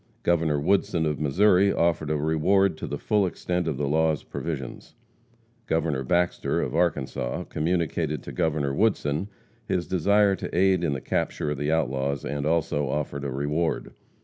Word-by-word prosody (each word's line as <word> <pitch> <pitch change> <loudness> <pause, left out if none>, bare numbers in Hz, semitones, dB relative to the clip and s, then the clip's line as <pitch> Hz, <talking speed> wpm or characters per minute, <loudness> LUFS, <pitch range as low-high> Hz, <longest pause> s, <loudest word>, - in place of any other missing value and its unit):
Governor 80 -4 +2
Woodson, 85 0 +1
of 75 -2 -1
Missouri, 95 +6 +4
offered 85 -4 +1
a 75 - +1
reward 80 +6 +2
to - - -4
the - - -3
full 105 -3 +1
extent 90 -1 -2
of 75 -5 -1
the 70 - -1
law's 80 +1 +1
provisions. 70 -6 -6 0.7
Governor 80 -4 0
Baxter, 85 +6 0
of - - -2
Arkansas, 75 -7 -1
communicated 80 -2 -1
to - - -7
Governor 75 -3 0
Woodson 95 -3 +1 0.4
his 90 -2 0
desire 100 +3 +3
to - - -5
aid 95 -1 +3
in 80 -4 +1
the 65 - -4
capture 75 - -1
of 75 - -3
the 75 +1 0
outlaws, 70 -3 -1
and 70 0 -2
also 80 -3 0
offered 70 0 -3
a 70 - -2
reward. 75 +5 -2
80 Hz, 160 wpm, -26 LUFS, 75-90 Hz, 0.7 s, Missouri